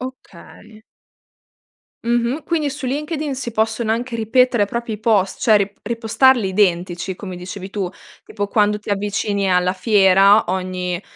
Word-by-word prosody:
Okay. 255 -3 -12 1.2
Mh-mh. 240 +5 0
Quindi, 315 -4 -1
su 280 -1 -6
LinkedIn 295 +2 -3
si 245 -3 -5
possono 220 +1 0
anche 235 +1 -2
ripetere 230 0 +2
proprio 235 +1 -4
i 210 - -7
post, 205 -4 +1
cioè 220 -2 +5
re 200 0 -2
repostarli 230 0 +2
identici, 185 -1 0
come 185 -2 -8
dicevi 185 +2 -8
tu, 195 -4 -3 0.3
tipo 205 -1 -4
quando 210 0 +2
ti 210 - -11
avvicini 200 -1 -1
alla 180 +1 +2
fiera 195 0 +4
ogni 185 -1 -3
210 Hz, 140 wpm, -19 LUFS, 190-235 Hz, 1.2 s, cioè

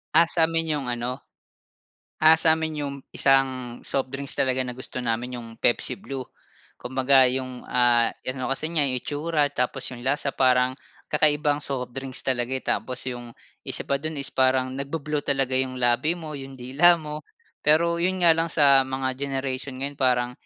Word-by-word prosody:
Ah. 165 - +8
Sa'min 165 -1 +1
'yong 145 -4 -2
ano, 120 +2 -3 1.0
ah, 160 +1 +7
sa'min 160 -1 +2
'yong 140 -1 -4 0.2
isang 130 -3 +2
soft 135 -1 -2
drinks 140 0 -2
talaga 130 -1 +1
na 125 -1 -4
gusto 130 - -6
namin 125 +1 -2
'yong 120 -1 -8
Pepsi 120 - +1
Blue. 135 -9 -6 0.5
Kumbaga 130 +1 +3
'yong, 130 0 -2
ah, 120 -2 +3 0.2
ano 130 0 -3
kasi 155 +4 -2
niya, 160 -4 +3
'yong 130 -2 0
itsura 150 +1 -1
tapos 125 -1 -2
'yong 125 0 -9
lasa 140 +1 0
parang 130 0 +2 0.3
kakaibang 150 -1 +2
soft 135 -4 -4
drinks 135 -1 -3
talaga, 125 -1 -1
eh. 130 - -2
Tapos 130 - -2
'yong 120 -1 -8 0.3
isa - - +1
pa 140 - +1
do'n 155 0 -5
is 140 - -2
parang 130 0 +2
nagbu-blue 145 +1 -3
talaga 135 -2 +1
'yong 130 -1 -1
labi 120 +7 +2
mo, 155 -4 -7
'yong 135 0 -9
dila 135 +8 +4
mo, 150 -1 -7 0.4
pero 170 +3 +3
'yon 185 +2 -1
nga 170 -1 +7
lang 165 0 +1
sa 140 -3 +5
mga 130 0 -3
generation 135 -1 -3
ngayon 140 +1 -4
parang 125 -2 +2
135 Hz, 170 wpm, -24 LUFS, 130-150 Hz, 1.0 s, Ah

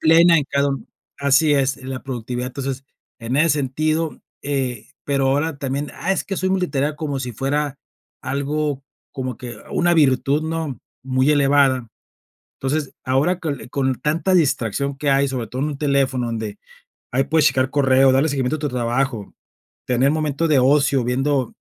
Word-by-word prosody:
plena 165 +1 +6
en 145 - -1
cada 140 0 +2
u 135 - -5 0.3
Así 140 +2 +4
es, 135 -1 +2
la 130 0 -6
productividad. 125 -1 -4
Entonces, 135 0 -5 0.3
en 120 +2 -3
ese 165 +2 +4
sentido, 155 +3 -1 0.2
eh, 130 -5 -2 0.2
pero 140 -1 +1
ahora 145 +2 0
también: 140 +2 -3
"Ah, 190 - -1
es - - -1
que 195 - -4
soy 185 - 0
multitarea". 155 -6 0
Como 150 -3 -3
si 125 -2 -4
fuera 140 +4 -1 0.5
algo, 140 +1 -2 0.3
como 130 -3 -4
que 120 -3 -8 0.2
una 175 0 +2
virtud, 140 -1 +3
¿no?, 160 -5 -3 0.2
muy 130 +2 +1
elevada. 140 -4 +3 0.7
Entonces, 140 +1 -1
ahora 140 +8 +1
con, 150 -6 -3
eh, - - -11
con 135 -1 0
tanta 165 +5 +1
distracción 140 - +1
que 145 -1 0
hay, 135 +1 +3
sobre 130 -3 -3
todo 130 +5 -4
en 150 - 0
un 145 -2 -5
teléfono, 135 -4 +1
donde 110 -3 -4 0.5
ahí 130 +2 +1
puedes 150 +1 +3
checar 130 -2 +2
correo, 135 -1 +4
darle 135 +4 +3
seguimiento 135 0 0
a - - -10
tu 150 0 -2
trabajo, 120 -2 -2 0.5
tener 125 +3 +2
momento 155 +1 0
de 140 -4 +4
ocio, 140 -1 +3
viendo 130 +1 0
140 Hz, 170 wpm, -21 LUFS, 130-150 Hz, 0.7 s, plena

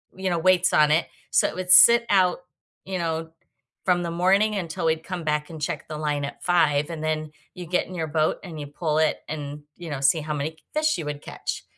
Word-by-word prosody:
you 190 0 -2
know, 175 - 0
weights 185 +1 +3
on 150 0 +5
it 160 +3 +2 0.2
so - - +4
it - - -6
would 185 0 -2
sit 235 +3 +8
out, 185 -3 +3 0.5
you 190 0 -3
know, 165 -1 -3 0.5
from 175 -1 +2
the 170 - -3
morning 195 +5 +2
until 170 -4 -3
we'd 160 0 +1
come 180 -3 -5
back 150 0 -1
and 160 -2 -9
check 155 0 -3
the 155 - -6
line 150 -2 -1
at 140 - -9
5, 150 -4 +2
and 155 -1 -6
then 155 -1 -2 0.2
you 180 - -7
get 180 - 0
in 185 - -10
your 160 -2 -2
boat 155 0 0
and 165 -4 -8
you 145 - -6
pull 150 +1 -2
it 155 - +2
and, 145 -1 -6
you 175 -2 -8
know, 145 -3 -4
see 145 +4 +3
how 150 0 -4
many 150 +2 -2
c 160 - -25 0.2
fish 305 -5 +1
you 155 - -5
would 145 -1 -5
catch - - -5
160 Hz, 240 wpm, -24 LUFS, 150-180 Hz, 0.5 s, sit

